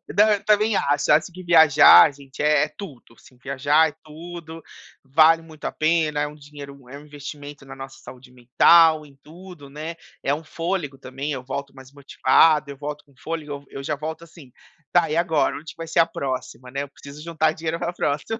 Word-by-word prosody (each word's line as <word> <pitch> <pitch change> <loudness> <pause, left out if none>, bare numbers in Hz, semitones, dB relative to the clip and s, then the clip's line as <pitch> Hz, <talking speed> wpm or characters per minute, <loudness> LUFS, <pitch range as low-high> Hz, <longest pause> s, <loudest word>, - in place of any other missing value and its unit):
Não, 210 +2 +5
eu 205 0 -3
também 215 0 +2
acho. 145 -3 +1
Acho 155 +4 +3
que 185 +1 -10
viajar, 160 -3 +7
gente, 135 0 -11
é 150 -1 +3
é - - -11
tudo. 140 - -11
Assim, 125 - -21
viajar 140 +4 +1
é 145 - -16
tudo, 165 +1 -10 0.4
vale 160 +4 +4
muito 160 -2 -13
a - - -2
pena. 155 -2 0
É 145 - -1
um 150 - -11
dinheiro 140 -3 -13
é 140 - -9
um 150 - -16
investimento 145 -1 -10
na 135 - -11
nossa 135 0 -10
saúde 125 0 -13
mental, 155 +6 +4
em 140 -1 -19
tudo 170 -2 -13
né. 155 +4 -7 0.3
É 140 - 0
um 155 +3 -5
fôlego 165 -3 -4
também. 135 +3 -6
Eu 130 -2 -5
volto 140 +1 -6
mais 130 -1 -15
motivado, 145 +2 +2
eu 140 - -8
volto 150 +1 -7
com 145 -2 -27
fôlego, 155 -1 -6 0.2
eu - - -10
eu 135 - -7
já 150 +1 -2
volto 160 +3 -7
assim, 155 -6 -16 0.4
tá 170 -3 +2
e 155 - -2
agora, 165 -3 +1
onde 155 0 -9
que - - -38
vai 165 0 -7
ser 165 - 0
a 165 - +6
próxima, 130 -5 -6
né. 140 +1 -3
Eu 140 - -10
preciso 140 +2 -13
juntar 160 -2 0
dinheiro 160 +1 -4
pra 175 - -3
próxima. 150 +10 -3
150 Hz, 210 wpm, -22 LUFS, 140-165 Hz, 0.4 s, viajar